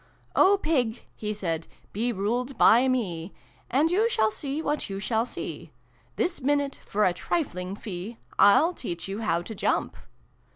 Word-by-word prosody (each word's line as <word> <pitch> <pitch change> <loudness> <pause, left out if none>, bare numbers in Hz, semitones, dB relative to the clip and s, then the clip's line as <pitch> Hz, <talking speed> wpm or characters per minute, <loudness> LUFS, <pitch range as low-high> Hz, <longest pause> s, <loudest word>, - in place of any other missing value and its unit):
" - - -34
O 400 +2 +5
Pig" 255 - 0 0.2
lie 210 -1 -1
said, 170 -6 -3
" - - -33
be 235 +4 0
ruled 240 +6 -2
by 245 +4 +6
me, 190 -9 -1 0.4
A 270 +5 +3
nd 325 - +2
you 430 +6 +3
shall 220 - +2
see 275 +6 -4
what 300 -5 -2
you 195 0 -4
shall 225 +3 0
see. - - -7 0.4
This 350 -3 -1
minute, 285 +1 0
for 210 +1 +2
a 180 - +3
trifling 185 - -2
fee, 205 +2 -6 0.2
Til 255 - +6
teach 175 - -5
you 195 +2 -4
how 170 -6 0
to 220 - -7
jump 205 - 0
225 Hz, 175 wpm, -27 LUFS, 195-280 Hz, 0.4 s, by